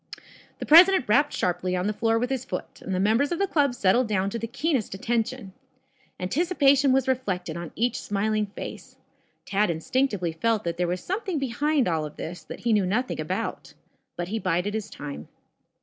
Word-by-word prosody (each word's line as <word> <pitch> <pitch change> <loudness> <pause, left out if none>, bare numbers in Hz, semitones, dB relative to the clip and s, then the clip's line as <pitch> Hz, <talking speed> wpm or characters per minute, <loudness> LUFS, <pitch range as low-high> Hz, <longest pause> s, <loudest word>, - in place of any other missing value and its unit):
The - - -5
president 350 -1 +7
rapped 285 +8 +3
sharply 180 +1 -1
on 180 0 -1
the 210 - 0
floor 225 +1 +1
with 245 +3 -1
his 260 -2 -1
foot, 185 -8 -6
and 190 - -3
the - - 0
members 225 - +2
of 345 - 0
the 395 - +2
club 285 -8 +1
settled 230 +3 +3
down 200 -2 0
to 230 - -3
the 230 - -4
keenest 270 - -1
attention. 225 0 -2 0.7
Anticipation 280 - +3
was 265 0 +2
reflected 190 -11 -2
on 170 -2 -6
each 240 +2 0
smiling 210 +1 0
face. 200 - -9 0.5
Tad 205 0 +1
instinctively 185 +2 0
felt 220 +6 0
that 170 -1 -3
there 180 0 0
was 180 +1 -2
something 385 -2 -2
behind 275 +1 0
all 160 -3 0
of 150 -1 -7
this 175 +2 -7
that - - -9
he 235 -2 +1
knew 200 -3 +2
nothing 245 +7 -1
about. - - -4 0.4
But 175 0 -4
he 220 +2 -2
bided 180 +2 -1
his 215 -1 -3
time. 145 - -8
220 Hz, 190 wpm, -25 LUFS, 185-265 Hz, 0.7 s, president